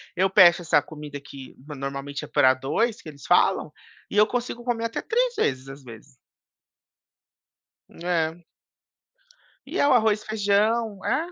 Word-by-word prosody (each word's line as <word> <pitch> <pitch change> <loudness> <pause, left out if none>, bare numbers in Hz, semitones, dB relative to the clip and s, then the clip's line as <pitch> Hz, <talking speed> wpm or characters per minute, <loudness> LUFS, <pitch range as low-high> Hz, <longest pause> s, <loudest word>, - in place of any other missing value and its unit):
eu 190 +2 +2
peço 180 -2 +6
essa 160 -3 +3
comida, 150 -1 -9
que 135 -1 -12
normalmente 140 -1 -6
é - - -7
pra 130 0 +4
2, 180 - -2
que 155 - -10
eles 140 -2 -13
falam, - - +2 0.4
e - - -3
eu 210 0 +6
consigo 240 0 -4
comer 235 -2 -2
até 230 - -3
3 - - 0
vezes, 130 0 -1
às 135 0 -11
vezes. 125 +3 -14 1.7
É. 165 -1 -2 1.3
E - - -4
é 285 - +4
o - - +4
arroz 220 -3 +2
e - - -20
feijão 215 0 0
É. 335 +3 -1
175 Hz, 155 wpm, -24 LUFS, 140-225 Hz, 1.7 s, peço